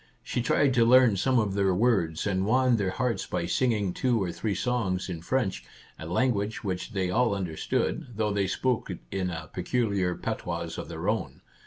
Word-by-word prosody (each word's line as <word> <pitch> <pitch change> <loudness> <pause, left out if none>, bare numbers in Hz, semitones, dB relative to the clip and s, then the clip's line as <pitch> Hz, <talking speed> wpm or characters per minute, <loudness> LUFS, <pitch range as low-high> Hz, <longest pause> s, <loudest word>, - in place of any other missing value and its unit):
She 120 - -2
tried 130 +3 +2
to 120 -2 +4
learn 125 -2 +6
some 130 +7 +2
of 105 -4 +1
their 95 -2 +2
words, 95 -8 +1
and 95 -2 0
won 125 +3 +3
their 100 -3 0
hearts 125 +3 -1
by 90 -2 -2
singing 105 -1 +1
two 125 +1 +1
or 90 -3 -1
three 100 +4 -2
songs 95 -5 -1
in 85 -3 -5
French, 95 - -1 0.4
a 80 - -7
language 105 +2 0
which 95 -2 -3
they 95 -3 0
all 115 0 +2
under 90 -5 -4
stood, - - -1
though 105 -1 0
they 100 -1 +1
spoke 125 +5 -1
it 90 - -4
in 95 -2 -1
a 85 -2 -6
peculiar 95 -2 0
patois - - -4
of - - -7
their - - -5
own. - - -2
100 Hz, 195 wpm, -27 LUFS, 90-120 Hz, 0.4 s, learn